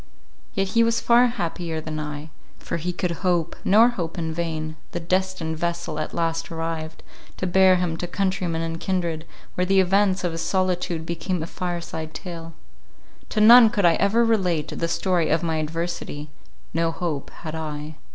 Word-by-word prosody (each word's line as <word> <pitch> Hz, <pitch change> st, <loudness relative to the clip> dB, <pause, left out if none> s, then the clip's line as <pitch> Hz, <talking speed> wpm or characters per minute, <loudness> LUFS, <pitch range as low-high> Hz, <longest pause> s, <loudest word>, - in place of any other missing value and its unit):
Yet 195 Hz, -2 st, 0 dB
he 230 Hz, +4 st, +3 dB
was 230 Hz, 0 st, +2 dB
far 240 Hz, +1 st, +5 dB
happier 170 Hz, -7 st, -3 dB
than 155 Hz, 0 st, -5 dB
I: 150 Hz, +1 st, -6 dB, 0.3 s
for -, -, -4 dB
he 175 Hz, +2 st, -2 dB
could 180 Hz, 0 st, -2 dB
hope, 175 Hz, -3 st, +1 dB
nor 220 Hz, +5 st, +6 dB
hope 175 Hz, -9 st, -4 dB
in 160 Hz, -1 st, -2 dB
vain—the 160 Hz, 0 st, -4 dB
destined 180 Hz, -2 st, -1 dB
vessel 170 Hz, -2 st, -2 dB
at 155 Hz, -, -3 dB
last 165 Hz, 0 st, -2 dB
arrived, 165 Hz, -1 st, -4 dB, 0.3 s
to -, -, -2 dB
bear 185 Hz, +1 st, +5 dB
him 175 Hz, -2 st, 0 dB
to 175 Hz, -, -3 dB
countrymen 180 Hz, -3 st, -1 dB
and 165 Hz, 0 st, -4 dB
kindred, 170 Hz, -4 st, -2 dB, 0.3 s
where 180 Hz, -, 0 dB
the 195 Hz, +1 st, +4 dB
events 190 Hz, 0 st, +3 dB
of 175 Hz, -, 0 dB
his 165 Hz, 0 st, -4 dB
solitude 180 Hz, -2 st, 0 dB
became 170 Hz, +1 st, -2 dB
a -, -, -2 dB
fire 175 Hz, 0 st, -4 dB
side 160 Hz, -1 st, -6 dB
tale. 165 Hz, -2 st, -7 dB, 0.8 s
To 215 Hz, -, 0 dB
none 230 Hz, +1 st, +9 dB
could 205 Hz, -4 st, +1 dB
I 170 Hz, -, +6 dB
ever 220 Hz, +7 st, +3 dB
relate 180 Hz, -9 st, +1 dB
the 165 Hz, -, -2 dB
story 175 Hz, -1 st, +1 dB
of 165 Hz, +2 st, +2 dB
my 165 Hz, -1 st, 0 dB
adversity; 155 Hz, -2 st, -4 dB, 0.4 s
no 165 Hz, +1 st, +1 dB
hope 165 Hz, -4 st, -3 dB
had 155 Hz, -, -5 dB
I. 155 Hz, -1 st, -5 dB
170 Hz, 175 wpm, -24 LUFS, 160-185 Hz, 0.8 s, none